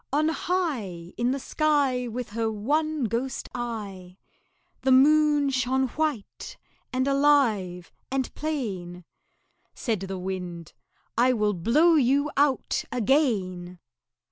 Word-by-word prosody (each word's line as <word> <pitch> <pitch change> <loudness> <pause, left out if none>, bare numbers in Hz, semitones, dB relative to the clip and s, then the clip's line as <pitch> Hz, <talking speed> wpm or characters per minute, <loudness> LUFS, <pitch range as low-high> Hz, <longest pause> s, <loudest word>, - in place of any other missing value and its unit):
On 305 +3 +2
high 250 - -2
In 240 +1 0
the 265 - 0
sky 280 -4 +1
With 240 0 -5
her 225 0 -1
one 300 +7 -1
ghost 235 +4 -2
eye, 200 -7 -6 0.6
The 265 - +2
Moon 295 +1 +5
shone 260 0 0
white 300 -7 -3 0.3
and 260 +1 0
alive 245 -11 +2 0.2
and 265 -1 -2
plain. 190 - -4 0.7
Said 225 -6 -2
the 190 0 -5
Wind 180 -3 -6 0.5
"I 255 +1 +4
will 210 -3 +1
blow 270 - +3
you 285 0 +2
out 280 -1 +1
again." 200 - 0
250 Hz, 115 wpm, -26 LUFS, 195-285 Hz, 0.7 s, Moon